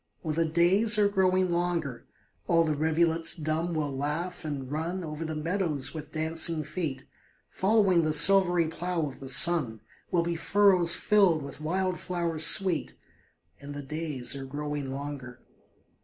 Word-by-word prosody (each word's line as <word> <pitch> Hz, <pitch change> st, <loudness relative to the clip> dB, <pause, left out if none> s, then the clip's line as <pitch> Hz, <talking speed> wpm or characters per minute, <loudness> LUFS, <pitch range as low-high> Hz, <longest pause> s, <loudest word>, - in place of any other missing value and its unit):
Oh, 155 Hz, -, -2 dB
the 165 Hz, +2 st, 0 dB
days 185 Hz, +7 st, +3 dB
are 205 Hz, -1 st, +3 dB
growing 185 Hz, -2 st, +1 dB
longer, 165 Hz, -8 st, -3 dB, 0.4 s
All 165 Hz, -1 st, +3 dB
the 155 Hz, -1 st, -1 dB
rivulets 160 Hz, +2 st, +1 dB
dumb 160 Hz, +1 st, -3 dB
will 145 Hz, -3 st, -3 dB
laugh, 150 Hz, +7 st, -4 dB
and 140 Hz, -4 st, -6 dB
run 170 Hz, +5 st, -4 dB
Over 155 Hz, 0 st, -6 dB
the 160 Hz, -1 st, -5 dB
meadows 155 Hz, -4 st, -2 dB
with 155 Hz, -2 st, -9 dB
dancing 160 Hz, 0 st, +1 dB
feet; 155 Hz, -2 st, -5 dB, 0.5 s
Following 195 Hz, -3 st, +2 dB
the 155 Hz, -1 st, -1 dB
silvery 175 Hz, +2 st, +5 dB
plough 170 Hz, 0 st, -3 dB
of 140 Hz, -, -9 dB
the 135 Hz, -, -8 dB
sun, 135 Hz, -5 st, +3 dB, 0.3 s
Will 170 Hz, -1 st, 0 dB
be 170 Hz, 0 st, -3 dB
furrows 180 Hz, 0 st, +4 dB
filled 190 Hz, -8 st, +2 dB
with 140 Hz, -, -10 dB
wild 185 Hz, +3 st, -2 dB
flowers 170 Hz, -3 st, 0 dB
sweet: 185 Hz, -3 st, +1 dB, 0.6 s
And 145 Hz, +1 st, -10 dB
the 145 Hz, -, -7 dB
days 150 Hz, -3 st, -3 dB
are 135 Hz, -1 st, -7 dB
growing 145 Hz, 0 st, -5 dB
longer. 135 Hz, -3 st, -8 dB
160 Hz, 155 wpm, -27 LUFS, 150-175 Hz, 0.6 s, silvery